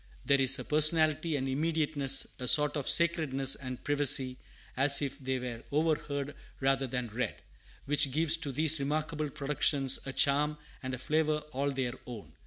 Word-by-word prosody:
There 140 -1 +2
is 135 0 +6
a - - -6
personality 155 +1 +3
and 135 -1 -3
immediateness, 150 -1 0
a 125 - -5
sort 150 +3 +5
of 145 -3 -2
sacredness 155 -6 +1
and 130 -2 -7
privacy, 135 -3 +1 0.4
as 140 +2 +5
if 135 -1 -5
they 130 -1 -3
were 125 -2 -7
overheard 145 -2 -2 0.2
rather 135 0 0
than 125 -1 -5
read, 120 +4 -5 0.5
which 145 0 +1
gives 155 +4 +1
to 150 -4 -6
these 155 +3 +3
remarkable 155 +2 -3
productions 140 -1 +1
a - - -4
charm 145 +2 +1 0.2
and 130 -1 -5
a - - -10
flavor 150 +3 -2
all 140 +1 -2
their 130 -3 -4
own. 115 -5 -10
140 Hz, 165 wpm, -29 LUFS, 130-150 Hz, 0.5 s, is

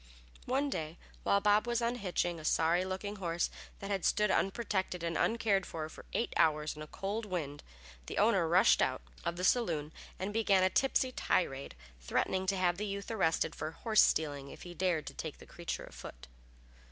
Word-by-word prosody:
One 275 +3 +1
day 160 -3 -4 0.2
while 200 - +3
Bob 210 +2 +4
was 240 0 +1
unhitching 200 -8 -1
a - - -10
sorry 165 +3 +3
looking 190 +2 -4
horse 170 -2 -1 0.3
that 200 0 -6
had 195 -2 -1
stood 210 -1 +3
unprotected 190 -4 0
and 165 -1 -1
uncared 215 -4 +2
for 160 -3 -5
for - - -12
eight 235 - -1
hours 155 -1 +2
in 150 - -9
a 155 - -7
cold 200 +7 -3
wind, 150 -6 -3 0.5
the - - -5
owner 200 -5 +4
rushed 185 +7 +5
out - - 0 0.2
of 170 - -1
the 180 - -5
saloon 165 -10 +1 0.2
and 195 +2 -3
began 200 -4 +3
a 185 - +3
tipsy 265 -1 +2
tirade, 140 - -1 0.2
threatening 185 - 0
to 195 0 +1
have 175 -1 +2
the 210 +1 -2
youth 200 +2 -4
arrested 165 -6 +1
for 155 - -4
horse 215 +6 +3
stealing 145 -3 +1
if - - -10
he 175 - -8
dared 175 -3 0
take - - -4
the - - -13
creature - - -5
a - - -11
foot. - - -10
185 Hz, 190 wpm, -33 LUFS, 165-210 Hz, 0.5 s, rushed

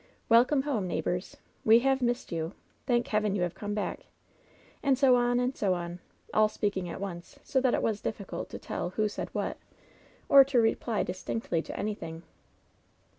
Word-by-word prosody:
"Welcome 250 +4 +5
home, 240 -10 -1
neighbors!'* 175 +2 -2
* - - -38
We 225 +2 +6
have 270 +1 +2
missed 245 0 -1
you 165 +1 -3 0.2
!" - - -38
"Thank 240 -2 +1
Heaven 210 -2 +1
you 185 - 0
have 175 - -1
come 205 0 -4
back 210 - -4 0.4
!'' - - -30
And 275 -2 +3
so 265 -2 +5
on 245 0 +2
and 250 +2 0
so 190 -3 +1
on! 175 0 -5 0.3
All 215 0 +4
speaking 200 -4 -2
at - - -6
once, 180 -3 -7
so 265 - +1
that 255 -2 +3
it - - -1
was 215 -2 0
difficult 200 -3 -5
to - - -6
tell 170 - -4
who 215 +4 0
said 210 - -5
what, - - -2 0.7
or 275 -1 +9
to 265 -2 +2
reply 225 -2 +1
distinctly 185 -2 -2
to - - -8
anything. 165 -6 -4
215 Hz, 190 wpm, -29 LUFS, 180-245 Hz, 0.7 s, or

